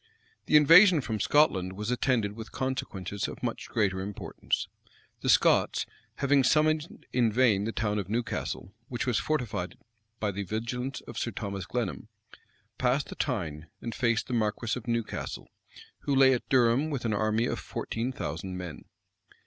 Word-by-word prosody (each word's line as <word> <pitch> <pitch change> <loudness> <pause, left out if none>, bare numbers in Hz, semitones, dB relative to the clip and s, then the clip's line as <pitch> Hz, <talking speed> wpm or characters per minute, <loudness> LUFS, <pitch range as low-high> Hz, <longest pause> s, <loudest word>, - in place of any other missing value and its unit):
The 150 - +7
invasion 165 +4 +8
from 110 -5 -3
Scotland 95 -13 +3
was 105 +4 -3
attended 125 -4 +1
with 110 0 -9
consequences 100 -7 -3
of - - -9
much - - -3
greater 95 -3 +1
importance. 100 +1 -3 0.5
The - - -2
Scots, - - +4 0.3
having 140 -1 +3
summoned 155 +3 +1
in 120 -3 +3
vain 110 -4 +3
the 115 - -1
town 105 -2 -1
of 100 -2 -5
Newcastle, 110 -3 -3
which 120 -1 -3
was 125 -3 +1
fortified 115 -11 -2 0.4
by 105 -1 0
the 100 +1 -4
vigilance 120 +6 -3
of 120 - -7
Sir - - -1
Thomas 100 -3 -5
Glenham, 120 -3 -3 0.7
passed 130 +3 +1
the - - -7
Tyne, 80 - -3
and 115 - -5
faced 115 -3 +1
the 125 - -5
marquis 110 0 0
of 125 -1 -8
Newcastle, 115 -2 -3 0.5
who 140 - -1
lay 135 0 +6
at 125 - -3
Durham 130 +3 +3
with 135 -5 -3
an 110 - +1
army 110 +2 +1
of - - -2
fourteen 115 +3 -3
thousand 90 - -5
men. 90 -4 -7
115 Hz, 160 wpm, -29 LUFS, 105-130 Hz, 0.7 s, invasion